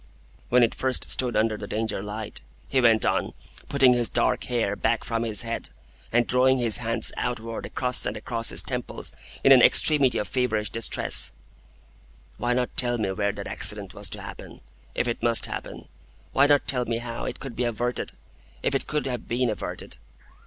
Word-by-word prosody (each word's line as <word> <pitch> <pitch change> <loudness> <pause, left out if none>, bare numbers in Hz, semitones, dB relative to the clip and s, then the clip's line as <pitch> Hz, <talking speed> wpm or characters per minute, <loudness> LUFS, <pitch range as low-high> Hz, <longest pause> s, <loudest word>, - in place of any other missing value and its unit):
"When 125 0 +5
it 115 - +2
first 130 -1 +1
stood 125 -3 0
under 110 0 +1
the 100 - -7
Danger 110 -1 -2
light," 105 +1 -6 0.3
he 130 - +1
went 115 -2 +4
on, - - 0 0.4
putting 135 -3 +5
his 120 -1 +1
dark 120 +1 +1
hair 115 -5 -1
back 115 +3 0
from 115 -1 -2
his 110 -2 +1
head, 115 0 -4 0.4
and 120 +1 +3
drawing 130 +2 +4
his 120 -3 +3
hands 115 -1 +1
outward 115 -2 -4
across 125 -1 0
and - - -3
across 115 -2 -3
his - - 0
temples 125 -2 -3 0.3
in - - +6
an - - +9
extremity 140 -5 +4
of - - -2
feverish 110 -5 -1
distress, 115 0 +1 1.1
"why 120 0 0
not 125 0 -2
tell 120 -3 +2
me 105 -4 -1
where 100 +1 0
that - - -7
accident - - +1
was - - -3
to - - -6
happen,—if 60 - -7
it 120 - -3
must 115 -1 +5
happen? - - -7 0.5
Why 140 +1 +5
not 145 -1 +3
tell 125 -2 +2
me 115 0 -1
how 115 0 -5
it - - -5
could 135 -2 -8
be 125 - -1
averted,—if 120 - -4
it 135 - -1
could 150 -3 -2
have 125 -4 -4
been 120 0 0
averted? 105 - -5
120 Hz, 180 wpm, -25 LUFS, 110-125 Hz, 1.1 s, an